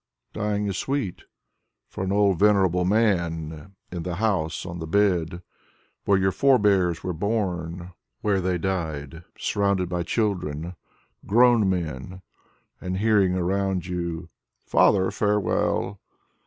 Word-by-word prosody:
Dying 105 -1 -1
is 95 -2 -2
sweet 135 -10 -3 0.6
For - - -5
an 95 - -2
old, 100 -3 +3
venerable 95 -4 +3
man 85 -5 0 0.2
In 90 -1 -4
the 90 0 -4
house 90 -7 -1
On 85 -1 -6
the 80 - -5
bed 90 -2 +1 0.6
Where 100 - +4
your 95 0 +2
forebears 100 -10 +3
were 90 - -2
bom, 90 -3 -3
— - - -48
^whcre 100 -2 +2
they 90 0 0
died, 80 -4 -3
Surrounded 100 -3 0
by 90 -1 -1
children 85 -4 -2 0.5
Grown 115 -2 +5
men, 90 0 -4 0.6
And 90 0 -3
hearing 100 -3 +3
around 95 0 0
you: 85 -2 -4 0.4
"Father, 95 -2 +3
farewell!" 105 -1 0
95 Hz, 125 wpm, -25 LUFS, 85-100 Hz, 0.6 s, Grown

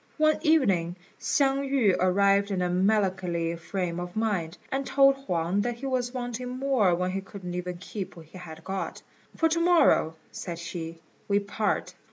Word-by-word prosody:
One 310 0 +3
evening 200 - +3 0.2
Hsiang 275 -1 +2
yü 240 -9 +3
arrived 200 +2 +3
in 190 -2 0
a 180 - 0
melancholy 185 -3 +1
frame 175 0 -3
of 175 0 -6
mind, 200 -7 -1
and 270 +1 0
told 275 0 +5
Huang 180 -7 -1
that 240 +2 -1
he 250 +4 -8
was 255 -2 -1
wanting 245 -1 -4
more 255 -10 +3
when 180 +1 -1
he 195 +1 -2
couldn't 190 -2 -8
even 180 0 -4
keep 190 +2 -6
what 165 -2 -12
he 185 +4 -12
had 160 -2 -10
got; 190 +1 -4 0.3
"for 325 - +4
to 335 +1 +1
morrow," 335 - +4 0.2
said 170 -2 -6
she, 170 -1 -6 0.3
"we 200 - +3
part." 205 +1 -2
195 Hz, 175 wpm, -27 LUFS, 175-250 Hz, 0.3 s, told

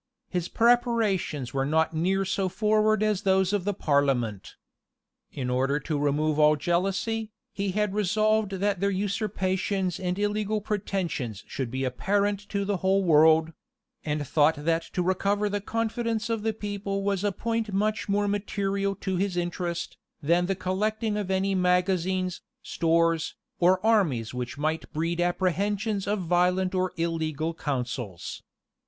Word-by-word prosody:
His 180 -2 -2
preparations 225 - +1
were 135 -1 +1
not 160 +3 +1
near 190 +5 +1
so 190 0 0
forward 215 +2 +2
as 210 -3 +1
those 190 -1 +2
of 200 -3 0
the 205 - +1
parliament. 135 - 0 0.8
In 130 -3 -4
order 135 +3 +1
to 150 0 -2
remove 150 +1 +1
all 150 0 +6
jealousy, 195 +7 -1 0.2
he 200 -1 -2
had 210 -1 0
resolved 215 +1 +1
that 195 0 0
their 200 +1 +1
usurpations 190 -2 -1
and 180 -1 -2
illegal 210 +1 0
pretensions 190 - -3
should 130 -3 -4
be 130 +2 -3
apparent 200 +10 0
to 200 -1 -1
the 200 -1 0
whole 190 +2 +2
world; 160 -1 +5 0.5
and 150 -1 -2
thought 155 +2 +3
that 165 0 +2
to 180 - 0
recover 200 +3 +1
the 205 0 -2
confidence 225 +1 -2
of 225 -2 -1
the 220 +1 0
people 200 -2 -3
was 200 -1 0
a 205 - +2
point 225 +2 -2
much 210 +2 -1
more 205 +1 +2
material 200 -1 -1
to 190 -1 -3
his 190 -1 -1
interest, 175 -1 -3 0.2
than 170 +4 +2
the 195 - 0
collecting 210 +4 -1
of 205 -3 -3
any 190 +1 +1
magazines, 185 0 +1 0.2
stores, 165 -1 +1 0.2
or 185 +1 +4
armies 160 - +2
which 125 +3 -5
might 155 +2 -2
breed 165 +2 -1
apprehensions 195 +3 0
of 205 -1 0
violent 180 +2 +2
or 185 0 0
illegal 165 -1 -1
counsels. 125 - -4
190 Hz, 150 wpm, -27 LUFS, 165-205 Hz, 0.8 s, all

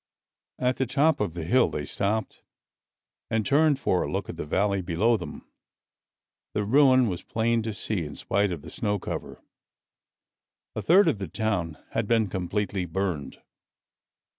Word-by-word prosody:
At 125 0 0
the 130 - 0
top 145 +4 +2
of 85 - -2
the 85 - -4
hill 125 +10 +3
they 75 - -4
stopped 105 +6 -2 0.9
and 110 -2 0
turned 145 +4 +4
for - - +1
a - - -2
look - - -3
at - - -5
the - - -6
valley 100 +4 +1
below 95 +7 +2
them. 90 - -7 1.1
The 105 - +1
ruin 130 +1 +5
was 90 -4 -3
plain 115 +1 0
to 110 0 -3
see 100 -2 -2
in 75 -2 -7
spite 100 0 0
of 80 -5 -5
the 80 - -10
snow 105 -2 -1
cover. 90 - -6 1.3
A - - -2
third 190 +5 +5
of 100 - +1
the 95 - -4
town 90 -5 -2
had 115 -2 -1
been 110 -3 +2
completely 95 +1 -2
burned. 85 -5 -3
105 Hz, 165 wpm, -26 LUFS, 90-115 Hz, 1.3 s, ruin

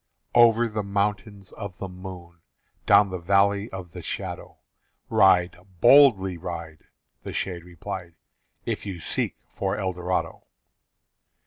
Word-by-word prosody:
"Over 120 0 +5
the 105 -1 -3
Mountains 100 0 -3
Of 100 -4 -8
the 95 - -5
Moon, 90 -2 -10 0.5
Down 100 -2 +5
the 90 - -4
Valley 100 +4 +2
of 95 -2 -8
the - - -8
Shadow, - - -6 0.5
Ride, 90 -1 +4 0.2
boldly 120 -8 +6
ride," 85 -3 -7 0.4
The - - -7
shade 90 -3 -3
replied, 85 0 -8 0.5
"If - - -3
you 95 -4 -6
seek - - -2
for 95 -1 -3
Eldorado!" 90 -2 -3
95 Hz, 120 wpm, -25 LUFS, 90-100 Hz, 0.5 s, boldly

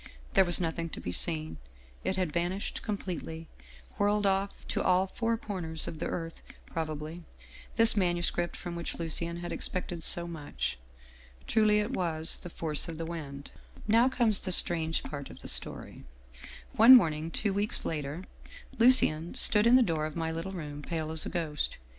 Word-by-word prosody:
There 195 -2 +5
was 175 -1 +4
nothing 165 -1 -2
to - - -5
be 90 - -5
seen. 155 - +1 0.5
It 190 - 0
had 180 -5 -1
vanished 175 +3 -2
com 210 -2 -2
pletely, 165 -3 -6 0.5
whirled 205 0 +2
off 195 0 -1
to - - -1
all 185 +1 +3
four 230 +4 -1
corners 175 -7 -2
of 155 - -6
the - - -2
earth 165 -1 -5 0.2
prob 160 -1 -4
ably, 155 +3 -7 0.5
this 225 -1 +5
manuscript 175 -2 +1
from 175 -1 -6
which 170 - -5
Lucien 170 +1 -1
had 175 - -5
expected 180 -2 -3
so 170 +1 +1
much. 150 - -4 0.7
Truly 215 -2 +3
it 210 +3 0
was 165 -6 0
' - - -20
The 175 - -8
Force 160 -2 -1
of 165 - -6
the 165 - -4
Wind/ 145 -4 -7 0.2
" - - -17
Now 245 +3 +5
comes 230 -6 +2
the 185 - -3
strange 165 -2 +2
part 140 -2 -7
of - - -12
the - - -7
story. - - -3 0.7
One 235 +4 +9
morn 170 -10 +5
ing, 155 +2 -5
two 200 +4 -1
weeks 205 +4 -1
later, 150 +2 -4 0.6
Lucien 200 -10 +5
stood 210 +1 +4
in 240 - +7
the 255 - +6
door 160 -6 -1
of 155 - -9
my 165 -1 -2
little 165 +4 -4
room, 150 -5 -6
pale 160 0 -4
as 160 -1 0
a - - -3
ghost. 160 -4 -2
170 Hz, 185 wpm, -30 LUFS, 160-195 Hz, 0.7 s, One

